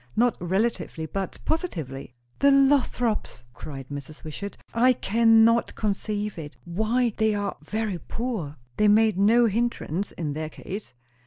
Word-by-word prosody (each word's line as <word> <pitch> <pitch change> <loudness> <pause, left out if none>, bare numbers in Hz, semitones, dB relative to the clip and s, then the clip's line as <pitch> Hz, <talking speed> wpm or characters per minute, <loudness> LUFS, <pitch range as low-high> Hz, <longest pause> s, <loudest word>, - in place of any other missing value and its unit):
Not 240 +2 +3
relatively, 185 -3 -1
but 190 +4 -4
positively." 155 - -3 0.2
"The 280 - +5
Lothrops!" 270 - +2
cried 135 +1 -8
Mrs. 145 +2 -8
Wishart. 200 +6 -6 0.2
"I 250 +2 +5
can 225 0 +4
not 230 +1 +2
conceive 210 -1 -2
it. 150 -2 -9
Why, 220 +7 0
they 220 -1 +2
are 205 -1 -2
very 215 -4 -2
poor." 215 - -4 0.2
"That 210 0 +4
made 215 -2 +4
no 230 +4 +5
hindrance, 210 -5 -1
in 150 -4 -3
their 155 +1 -4
case." 195 -1 -8
210 Hz, 140 wpm, -25 LUFS, 165-230 Hz, 0.2 s, The